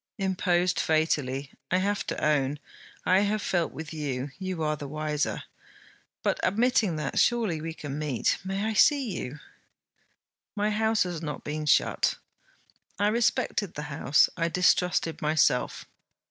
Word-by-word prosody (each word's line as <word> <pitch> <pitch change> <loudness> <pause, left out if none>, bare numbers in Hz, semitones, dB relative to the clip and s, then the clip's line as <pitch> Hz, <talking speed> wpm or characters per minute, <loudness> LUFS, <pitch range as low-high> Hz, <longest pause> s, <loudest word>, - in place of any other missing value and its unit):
'Imposed 180 -2 +1
fatally, 145 -4 0 0.2
I 185 - +2
have 200 +2 -1
to - - -2
own. 145 -2 +1 0.5
I 185 +1 +5
have 205 +1 +1
felt 175 -4 0
with 160 +3 -8
you: 140 -3 -3
you 185 -4 -3
are 155 0 +1
the 145 -1 -7
wiser. 150 +1 -2 0.8
But, - - +1
admitting 215 -2 +2
that, 150 -3 -2
surely 220 -10 +2
we 165 0 -5
can 145 -2 -6
meet. 145 -6 0
I - - -9
may 200 +3 -1
see 275 +1 +4
you?' 130 +4 -5 1.2
'My 210 0 0
house 220 +1 +2
has 175 -3 -5
not 150 -3 -5
been 150 +1 -4
shut.' - - +3 0.8
'I 205 +1 +2
respected 215 -4 0
the 150 - -4
house. 140 +1 +4
I 165 -1 0
distrusted 180 -1 +2
myself.' 150 -4 +1
165 Hz, 145 wpm, -27 LUFS, 150-200 Hz, 1.2 s, I